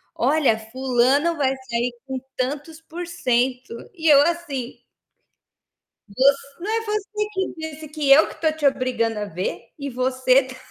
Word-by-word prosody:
"Olha, 270 -3 +2
fulano 260 +7 +1
vai 275 -3 +2 0.2
sair 235 +1 -1
com 265 -1 -3 0.2
tantos 295 +5 -3
por 340 +2 -7
cento". 250 -6 0 0.2
E 325 -2 -2
eu 285 -2 +8
assim 295 -7 -3 1.4
"Você 275 +3 +2
não 400 - -3
é 450 0 0
você 420 0 -2
que 380 -1 -2
disse 315 -1 -7
que 300 -2 -2
eu 295 +4 +7
que - - -13
tô 315 -1 +3
te 305 -2 -1
obrigando 245 -4 0
a 210 - -3
ver? 185 -1 -4 0.2
E 280 -1 -4
você 255 +1 +2
tá 260 0 -10
275 Hz, 155 wpm, -22 LUFS, 255-320 Hz, 1.4 s, eu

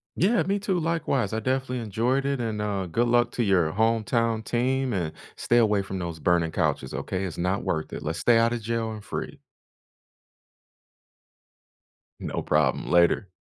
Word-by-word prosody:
Yeah, 215 +8 +3
me, 200 +1 0
too, 190 -3 0
likewise, 155 -9 -1
I 110 - 0
definitely 130 +1 -1
enjoyed 120 +5 0
it, 140 -2 -1
and, 110 -2 -2
uh, 100 -3 -2
good 120 +8 +1
luck 120 0 +3
to 120 - 0
your 90 -6 +2
hometown 115 +1 +1
team, 130 +3 0
and 85 -7 -2 0.2
stay 120 - +1
away 105 -4 +3
from 95 -1 -5
those 85 -2 -5
burning 85 -1 +2
couches, 65 -3 -1
okay? 95 +1 -3
It's 90 - -5
not 90 +3 -1
worth 80 -1 -2
it, - - -5
let's 80 +2 -3
stay 115 +7 +4
outta 115 +1 +2
jail, 115 0 -2
and 105 -1 -8
free. - - -6 2.8
No - - -3
problem, - - +1
later. 85 +3 +3
110 Hz, 165 wpm, -26 LUFS, 95-120 Hz, 2.8 s, stay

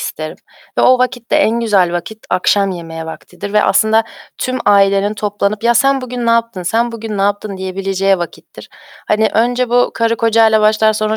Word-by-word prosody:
isterim - - -6 0.4
ve - - +3
o 255 0 +5
vakitte 250 -2 -1
en 230 +2 +2
güzel 195 -6 +2
vakit, 175 +5 -5
akşam 195 +2 +2
yemeği 165 -2 -7
vaktidir 180 +4 -9
ve 210 - +3
aslında 220 +1 +3 0.4
tüm 255 0 -2
ailenin 200 0 +3
toplanıp, 205 +1 -2
"Ya, 235 - +3
sen 275 +2 +3
bugün 250 -1 -5
ne - - +3
yaptın, 230 -4 0
sen 230 +6 0
bugün 220 -3 -6
ne - - +1
yaptın?" 205 0 -2
diyebileceği 195 0 -1
vakittir. 175 - -9 0.4
Hani, 215 +1 +2
önce 245 +2 +1
bu 245 0 +3
karı 230 0 0
kocayla 225 -1 +3
başlar, 215 0 +3
sonra 215 0 -1
215 Hz, 175 wpm, -15 LUFS, 195-230 Hz, 0.4 s, o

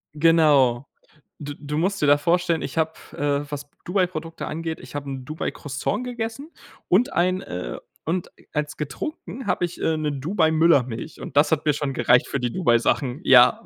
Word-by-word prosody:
Genau. 145 -6 +4 0.6
D 145 0 -6
du 150 +1 -4
musst 190 +5 0
dir 150 - +3
da 145 - +6
vorstellen, 170 +1 +1
ich 135 - -5
habe, 160 0 +2 0.2
äh, 145 0 -1
was 145 0 -6 0.2
Dubai-Produkte 175 -3 -2
angeht 160 +1 -4
ich 125 - -12
hab 145 -1 -4
'n 135 -2 -5
Dubai-Croissant 155 - -3
gegessen 245 +4 -5 0.4
und 240 +10 +3
ein, 185 +2 +2
äh, 90 - -5 0.3
und 170 +3 -2 0.2
als 150 0 -2
getrunken 240 - -6
hab 180 - 0
ich, 175 0 -3
äh, 160 - +1
'ne 155 -1 -1
Dubai-Müllermilch, 155 - +1
und 140 - -6
das 145 +3 +5
hat 155 0 -1
mir 150 - +5
schon 145 -1 -2
gereicht 120 0 +4
für 140 - -2
die 120 -1 -1
Dubai-Sachen. 125 -3 +1
Ja,, 125 -2 +6
150 Hz, 170 wpm, -24 LUFS, 140-175 Hz, 0.6 s, da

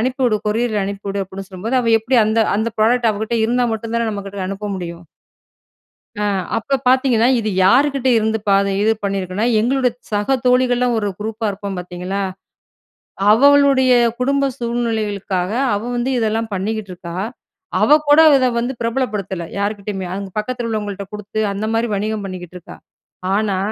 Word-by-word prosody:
அனுப்பிவுடு, 250 -2 +1
கொரியர்ல 215 -1 0
அனுப்பி 200 0 -6
வுடு 195 0 -1
அப்படின்னு 190 +1 -9
சொல்லும்போது, 210 +7 -2
அவள் 230 -2 +3
எப்படி 245 +3 +2
அந்த 220 +1 +2 0.2
அந்த 225 +2 0
ப்ராடக்ட் 230 +1 +3
அவகிட்ட 220 +3 -2
இருந்தா 245 +1 +1
மட்டும் 230 +1 -5
தான 230 -1 0
நம்ம 200 -1 -5
கிட்ட 195 -1 -6
அனுப்ப 200 +1 -5
முடியும்? 170 -1 -7 1.1
அ 210 - -3 0.3
அப்ப 275 +5 0
பார்த்தீங்கன்னா, 250 -3 +3
இது 220 -2 -2 0.2
யாருகிட்ட 265 +5 +3
இருந்து 220 0 0
பாத 195 0 +4 0.2
இது 220 - +3
பண்ணியிருக்குன்னா 195 +2 -1
எங்களோட 255 +2 +2 0.2
சக 210 +6 +1
தோழிகள்லாம் 250 -1 +3
ஒரு 205 -1 -1
குரூப்பா 220 +1 -3
இருப்போம் 200 -1 -5
பார்த்தீங்களா. 180 +2 -4 1.1
அவளுடைய 275 +1 +5 0.3
குடும்ப 275 +2 +1
சூழ்நிலைகளுக்காக 215 -6 -2 0.2
அவள் 230 +4 -3
வந்து 240 +2 -1
இதெல்லாம் 225 0 -1
பண்ணிக்கிட்டுருக்கா. 190 -4 -4 0.7
அவள் 300 +1 +5
கூட 290 +2 +6 0.2
இத 255 -1 +2
வந்து 245 +3 -2
பிரபலப்படுத்தல, 210 -7 -2 0.2
யார்க்கிட்டயுமே. 200 -2 -3
அங்க 195 0 -5
பக்கத்தில் 240 +2 -2
உள்ளவங்கள்ட்ட 205 -3 -3
கொடுத்து. 210 +1 -5
அந்த 200 +2 -3
மாதிரி 230 +1 +1
வணிகம் 210 +1 -2
பண்ணிக்கிட்டு 180 -2 -8
இருக்கா. 175 - -12 0.6
ஆனா, 205 -3 0
220 Hz, 145 wpm, -19 LUFS, 200-245 Hz, 1.1 s, கூட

